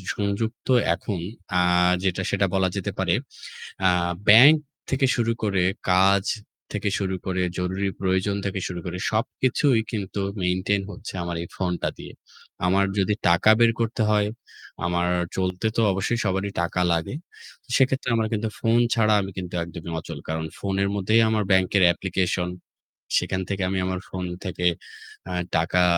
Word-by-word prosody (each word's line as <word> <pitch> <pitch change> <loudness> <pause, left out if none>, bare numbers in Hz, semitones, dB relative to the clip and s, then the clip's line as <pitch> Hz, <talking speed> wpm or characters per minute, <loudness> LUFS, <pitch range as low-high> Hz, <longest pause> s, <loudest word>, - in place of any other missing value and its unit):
সংযুক্ত 105 +3 -2 0.3
এখন 95 +1 -4 0.4
আ - - +4 0.4
যেটা, 95 0 0
সেটা 100 0 +2
বলা 95 -1 +2
যেতে 100 - -2
পারে - - +2 0.8
আ - - +5 0.4
ব্যাংক 125 +9 +9 0.3
থেকে 135 0 +2
শুরু 115 -2 +1
করে, 100 -4 +1 0.3
কাজ 95 +1 +4 0.5
থেকে 105 0 -1
শুরু 95 -1 -2
করে, 95 -1 0 0.2
জরুরি 95 +2 -1
প্রয়োজন 95 +1 +1
থেকে 100 -1 -2
শুরু 90 -1 -5
করে, 90 +1 -4
সবকিছুই 125 +3 +1
কিন্তু 100 -2 -3 0.2
maintain 95 +3 +1
হচ্ছে 95 - -8
আমার 85 0 -3
এই 85 - -7
ফোনটা 90 -2 -1
দিয়ে। - - -9 0.5
আমার 95 +2 +3
যদি 100 +2 +2
টাকা 85 +5 +5
বের 115 -1 +5
করতে 115 0 0
হয়, 105 -1 +3 0.6
আমার 90 0 0 0.3
চলতে 95 +2 -1
তো - - +3
অবশ্যই 100 +5 -1
সবারই 95 +1 -1
টাকা 85 +1 -2
লাগে। 85 +7 -1 0.6
সেক্ষেত্রে 135 -1 +2
আমার 110 -1 0
কিন্তু 110 0 -1
ফোন 115 +1 +3 0.2
ছাড়া 110 -2 +3
আমি 95 - -4
কিন্তু 90 -1 -6
একদমই 85 0 -8
অচল। 80 -1 -7
কারণ 80 0 -2
ফোনের 100 0 0
মধ্যেই 110 +3 +3
আমার 110 -1 +1
ব্যাংকয়ের 95 0 +4
application। 90 -1 -1 0.7
সেখান 95 - -2
থেকে 100 -1 -2
আমি 95 - -1
আমার 95 0 -2
ফোন 95 0 -5 0.2
থেকে 90 -1 -2 0.6
আ - - -3 0.2
টাকা 85 +2 +2
95 Hz, 150 wpm, -24 LUFS, 90-105 Hz, 0.8 s, ব্যাংক